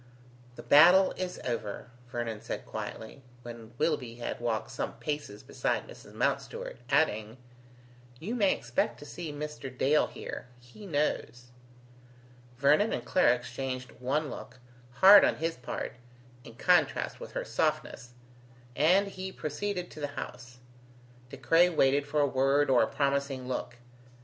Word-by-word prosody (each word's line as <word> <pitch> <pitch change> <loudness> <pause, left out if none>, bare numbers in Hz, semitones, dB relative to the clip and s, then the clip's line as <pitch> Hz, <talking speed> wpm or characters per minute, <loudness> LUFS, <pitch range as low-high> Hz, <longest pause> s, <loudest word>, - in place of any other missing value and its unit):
"The - - -10
battle 180 +6 +7
is 185 -1 -4
over," 120 -1 -4 0.2
Vernon 120 -3 -4
said - - -5
quietly, 110 +5 -7 0.2
when 115 -1 -10
Willoughby 125 -7 -1
had 120 - -5
walked 115 -2 -2
some - - -4
paces 145 -9 -5
beside - - -2
Mrs. - - -13
Mountstuart, - - -2
adding: 110 -6 +1 0.8
"You 205 +8 -4
may 205 -6 +3
expect 120 0 -1
to 145 - -11
see 165 +1 -6
Mr. 150 -2 -6
Dale 135 +4 +2
here. - - -8
He 125 - -13
knows." 125 -6 -2 1.1
Vernon 150 - +4
and - - -3
Clara 125 -10 +4
exchanged 125 +1 -5
one 140 +4 -1
look, - - -9 0.4
hard 195 +9 +9
on - - +3
his 165 +1 -2
part, 125 - -5 0.5
in 115 - -13
contrast 180 +8 +2
with - - -9
her - - -3
softness, 125 - -2 0.6
and 180 +7 +4
he 190 -1 -6
proceeded 180 +2 -4
to - - -10
the 145 - -2
house. 125 0 -7 0.7
De 140 - -9
Craye 165 +8 +4
waited 140 -3 +2
for 150 +1 +1
a - - +4
word 135 +1 +2
or 125 - +5
a 110 - +3
promising 140 -2 -1
look. 125 -1 -4
140 Hz, 145 wpm, -29 LUFS, 125-165 Hz, 1.1 s, hard